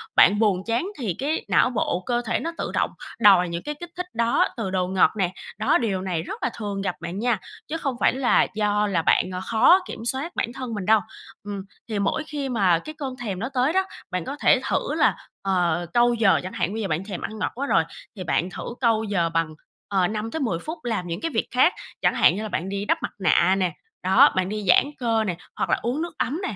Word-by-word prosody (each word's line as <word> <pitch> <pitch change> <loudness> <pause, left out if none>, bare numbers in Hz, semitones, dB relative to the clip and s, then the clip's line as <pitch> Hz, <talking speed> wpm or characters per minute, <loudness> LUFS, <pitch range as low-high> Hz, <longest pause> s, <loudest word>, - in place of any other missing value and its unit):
bạn 205 +3 +6
buồn 200 -4 +2
chán 235 +10 0
thì 210 -9 -2
cái 295 +4 -1
não - - +4
bộ, 200 -6 -1
cơ 240 -1 0
thể - - 0
nó 335 - -3
tự - - -3
động - - +1 0.3
đòi 195 -5 +6
những 170 0 -4
cái 295 - -4
kích 345 - -7
thích 360 - -2
đó 230 0 +2
từ 220 -5 -2
đồ 185 -1 0
ngọt 190 0 +4
nè. 185 -2 0 0.2
Đó, - - +3
điều 200 -6 -1
này 180 -4 -2
rất - - -7
là 250 - +2
thường 205 -3 -3
gặp 190 -2 -2
bạn 170 +3 -5
nha, 235 -2 +1 0.3
chứ 325 - -3
không 275 -5 -2
phải - - +3
là 260 -1 +3
do 210 0 +1
là 180 -5 +1
bạn, 175 - +3
ờ, 180 - -3
khó 230 +11 +6
kiểm 225 - -7
soát 270 +8 -1
bản 235 - -2
thân 255 -3 -5
mình 205 -3 -4
đâu. 220 +2 +5 0.4
Ừm, 200 -1 -5 0.3
thì 215 -2 -1
mỗi 200 +10 0
khi 285 -3 -3
mà 190 -8 +3
cái 310 - -9
cơn 270 -4 -4
thèm 200 -6 -3
nó 230 +5 -3
tới 260 +4 +2
đó, 380 +1 +3 0.3
bạn 180 -2 -2
có 280 - -4
thể - - +4
thử - - 0
là, - - +3 0.3
ờ, 175 -3 +1
câu 240 0 +4
giờ 220 -5 +4
chẳng 185 - -6
hạn, 190 - -1
bây 225 - -3
giờ 200 - -1
bạn 165 +2 -1
thèm 195 -4 -6
ăn 220 0 -5
ngọt - - -1
quá 280 +3 -3
rồi - - +3 0.3
thì 190 - -6
bạn 175 +1 0
thử - - -7 0.2
câu 225 -3 +2
giờ 190 -6 0
bằng, 165 -1 -1 0.3
ờ, 190 -3 +2
5 215 +2 -4
tới 320 - -3
10 225 - -1
phút 315 - -6
làm 220 -7 -2
những 170 - -4
cái 330 - -2
việc 225 - -1
khác. 255 +8 +4 0.3
Chẳng - - +2
hạn - - +5
như 210 - -3
là 215 - -4
bạn 185 -1 -3
đi 200 +1 -3
đắp - - +2
mặt - - -2
nạ 185 0 +4
nè, 185 -2 +1 0.3
đó, 190 +1 +6
bạn 185 0 0
đi 210 0 -4
giãn 180 - +6
cơ 225 -3 +1
nè, 185 -5 -2 0.2
hoặc - - -2
là - - +2
uống 250 +6 -1
nước 335 -1 -5
ấm 290 +4 -1
nè, 220 - -4
210 Hz, 255 wpm, -24 LUFS, 185-245 Hz, 0.4 s, bạn